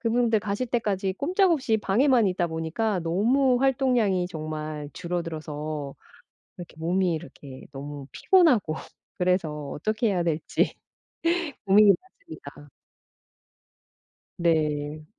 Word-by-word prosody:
그분들 230 -1 +2
가실 210 +4 -2
때까지 200 -5 -1
꼼짝없이 320 - +2
방에만 235 +3 +3
있다 180 -1 0
보니까 165 +6 -1
너무 245 +10 +2
활동량이 245 -9 +2
정말 155 -2 -5
줄어들어서 165 -3 -4 0.4
어 - - -21 0.6
이렇게 175 -3 -10
몸이 180 +2 +1
이렇게 140 -3 -9
너무 140 0 -7
피곤하고 265 - +3 0.4
그래서 160 -5 0
어떻게 215 +8 -1
해야 185 -3 0
될지 165 -2 0 0.9
고민이 200 +1 +7
많습니다. 325 - -13 1.7
네. 155 -3 0
185 Hz, 260 characters per minute, -26 LUFS, 155-235 Hz, 1.7 s, 고민이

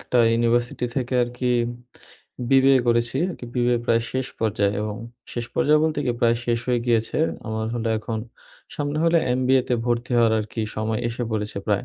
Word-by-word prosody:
একটা - - -2 0.2
ইউনিভার্সিটি 120 +1 +1
থেকে 130 -1 -1
আরকি 120 +1 -3 1.0
BBA 135 0 +6
করেছি 120 +1 +2
আরকি, 160 - -8
BBA 120 -1 +2
প্রায় 115 -1 +2
শেষ 130 -1 -1
পর্যায়ে। 105 -2 +1
এবং 105 -1 -3 0.4
শেষ 120 - -3
পর্যায়ে 150 +1 +4
বলতে 155 -2 0
কি? 125 - +1
প্রায় 115 0 +3
শেষ 120 -1 +1
হয়ে 120 -1 +2
গিয়েছে। 115 +1 +1 0.3
আমার 110 0 -2
হলো 115 -1 -2
এখন 110 +1 -4 0.6
সামনে 145 0 -2
হলো 165 0 +4 0.2
MBA 130 +1 +3
তে 125 - +2
ভর্তি 120 +1 -1
হওয়ার 115 -1 +4
আরকি 110 +1 -5 0.2
সময় 110 0 -1
এসে 120 +1 -4
পড়েছে 105 -2 -2
প্রায়। 105 -2 +1
120 Hz, 170 wpm, -23 LUFS, 110-125 Hz, 1.0 s, BBA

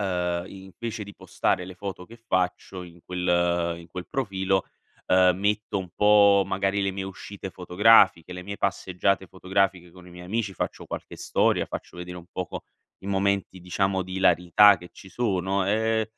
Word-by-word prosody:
,ehm, 90 -2 -1
invece 100 +4 -7
di 100 - -12
postare 90 - -1
le 95 - -9
foto 90 -1 -7
che 115 - -13
faccio 95 -3 -2
in 85 -1 -13
quel 85 -1 0
in 85 - -13
quel 90 +1 -7
profilo, 95 -6 -1 0.4
uhm, 90 -1 +5
metto 105 0 0
un 95 - -6
po' 100 -1 +5
magari 95 +1 0
le 95 - +1
mie 95 0 -5
uscite 95 0 -8
fotografiche, 90 -1 +4
le 90 - -7
mie 100 +2 -6
passeggiate 95 0 0
fotografiche 95 -1 -1
con 90 +1 -15
i - - -13
miei 90 0 -11
amici, 105 +1 -2
faccio - - -4
qualche - - -7
storia, - - +1
faccio - - -8
vedere 90 0 -7
un 85 - -13
poco 90 -2 -5 0.3
i 95 - -12
momenti 100 -1 0
diciamo 95 +1 0
di 95 +1 -9
ilarità 95 +2 +5
che 90 0 -13
ci 95 - -14
sono, 95 -2 -1
ehm 110 +1 +1
95 Hz, 170 wpm, -25 LUFS, 90-100 Hz, 0.4 s, uhm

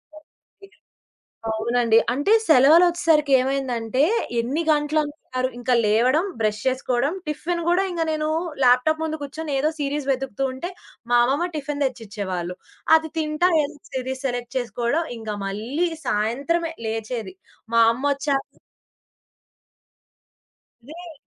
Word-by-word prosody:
Okay. 355 +6 -19 0.8
అవునండి. 230 +1 +2 0.2
అంటే 290 - +2
సెలవలొచ్చేసరికేమైందంటే 275 -6 +3 0.4
ఎన్ని 265 +8 -1
గంటలనుకున్నారు. 295 -3 -1
ఇంక 245 +1 -2
లేవడం, 250 - +3
బ్రష్ 215 -1 0
చేసుకోడం. 260 +2 0
టిఫిన్ 340 +3 -2
గూడా 355 +3 +3
ఇంగ 335 -2 -1
నేను 310 0 -1 0.3
ల్యాప్‌టాప్ 255 +6 +4
ముందు 315 0 -3
కూర్చొని 290 +1 -5
ఏదో 305 +3 +1
సీరీస్ 285 0 -2
వెదుకుతు 270 -1 -2
ఉంటే 345 +8 -5 0.4
మా 240 - +6
అమ్మమ్మ 285 +8 0
టిఫిన్ 290 -1 -2
దెచ్చిచ్చేవాళ్ళు. 200 -8 -4 0.4
అది 320 0 -5
తింటా 310 +3 +1
ఏదో 290 +1 -6
సీరీస్ 260 0 -4
సెలెక్ట్ 245 -1 -5
చేసుకోడం 240 +6 -1
ఇంగ 220 -1 -8 0.2
మళ్ళీ 235 - -2 0.2
సాయంత్రమే 280 +11 0
లేచేది. 220 -3 -4 0.4
మా 230 - +5
అమ్మొచ్చాక 275 +2 -1 2.4
రేయ్! 335 +2 -10
270 Hz, 105 wpm, -23 LUFS, 240-310 Hz, 2.4 s, మా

